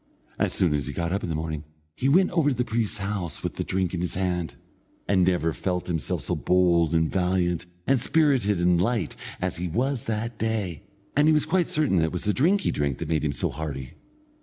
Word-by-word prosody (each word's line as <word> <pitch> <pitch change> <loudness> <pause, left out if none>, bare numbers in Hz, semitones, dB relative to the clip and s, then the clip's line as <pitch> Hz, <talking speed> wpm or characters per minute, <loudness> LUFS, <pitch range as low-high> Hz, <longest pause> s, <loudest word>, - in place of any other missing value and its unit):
As - - +2
soon 85 -5 +2
as 75 -2 -1
he 75 - -4
got 85 +2 -2
up 100 - -1
in - - -4
the 80 - -1
morning, 80 -1 -3 0.3
he 130 +11 0
went 185 +6 +4
over 165 -5 +3
to 135 - 0
the 125 +1 0
priest's 110 -2 -1
house 100 -4 -4
with - - -2
the - - -1
drink 95 -1 -1
in 85 - -2
his 90 - -2
hand, 90 -3 -1 0.5
and 95 -3 +3
he - - +5
never 80 -2 0
felt 90 +1 -2
himself 80 -4 -2
so - - -2
bold 85 -3 +3
and 80 -1 +2
valiant, 90 -2 0 0.2
and 135 -3 +2
spirited 130 - +2
and 90 0 +3
light, 105 -4 0 0.2
as - - -2
he 90 +1 -2
was 125 - -1
that 115 +1 -3
day, 105 -8 -2 0.3
and 145 +2 +4
he - - +6
was 150 - +2
quite 175 +1 +1
certain 150 -11 +2
that 80 - +3
it 80 - -2
was 90 - -2
the 105 - +1
drink 180 - +3
he - - 0
drank 70 -3 -1
which - - -4
made 80 -2 +1
him 75 - +1
so 70 - -1
hearty. 70 -3 -5
90 Hz, 235 wpm, -25 LUFS, 85-115 Hz, 0.5 s, he